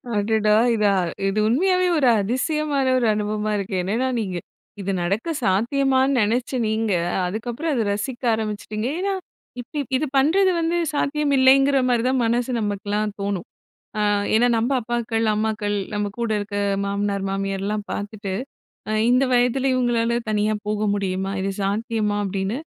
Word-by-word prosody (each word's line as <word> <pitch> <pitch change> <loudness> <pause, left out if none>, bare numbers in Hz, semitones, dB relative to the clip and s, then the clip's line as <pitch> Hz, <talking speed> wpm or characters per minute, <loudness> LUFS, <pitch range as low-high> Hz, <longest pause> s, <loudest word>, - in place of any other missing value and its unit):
அடடா! 210 +1 +2 0.2
இதா 210 -2 +3 0.3
இது 195 +2 0
உண்மையாவே 365 +8 +2
ஒரு 270 - +3
அதிசயமான 280 +5 0
ஒரு 245 - +1
அனுபவமா 210 0 -2
இருக்கு. 195 -1 -3
என்னன்னா 225 +8 0
நீங்க 190 -5 -3 0.4
இது 195 0 -2
நடக்க 200 - -1
சாத்தியமான்னு 265 +7 +2
நெனச்ச 230 +3 0 0.2
நீங்க 220 0 0 0.4
அதுக்கப்புறோம் 240 - -3
அத 235 - +1
ரசிக்க 240 +5 -4
ஆரமிச்சூட்டீங்க. 215 +1 -3
ஏன்னா 395 +1 0 0.5
இப் - - -16
இ - - +1 0.2
இது 305 - -1
பண்றது 370 +8 +4
வந்து 335 +1 0 0.2
சாத்தியம் 290 0 0
இல்லைங்குற 270 +1 +5
மாதிரி 240 -2 +2
தான் 260 -1 +1
மனசு 240 +2 0
நமக்கெல்லாம் 205 0 -2
தோன்னும். 200 -3 -3 0.5
அ - - 0 0.3
ஏன்னா 235 +3 +4
நம்ம 230 +4 0
அப்பாக்கள், 230 -1 -1
அம்மாக்கள், 210 -1 -1 0.2
நம்ம 205 0 -1
கூட 235 -1 -1
இருக்க 205 0 -5 0.3
மாமனார், 200 0 -1
மாமியார்லாம் 195 +2 -2
பார்த்துட்டு 205 -1 -5 0.8
இந்த 255 +2 +4
வயதுல 250 +2 +2
இவுங்களால 235 -2 +1 0.2
தனியா 210 0 +1
போக 210 0 -1
முடியுமா, 195 -1 -2
இது 195 +1 -1
சாத்தியமா? 210 +1 -1
அப்படீன்னு. 195 +3 -2
220 Hz, 140 wpm, -22 LUFS, 205-255 Hz, 0.8 s, இல்லைங்குற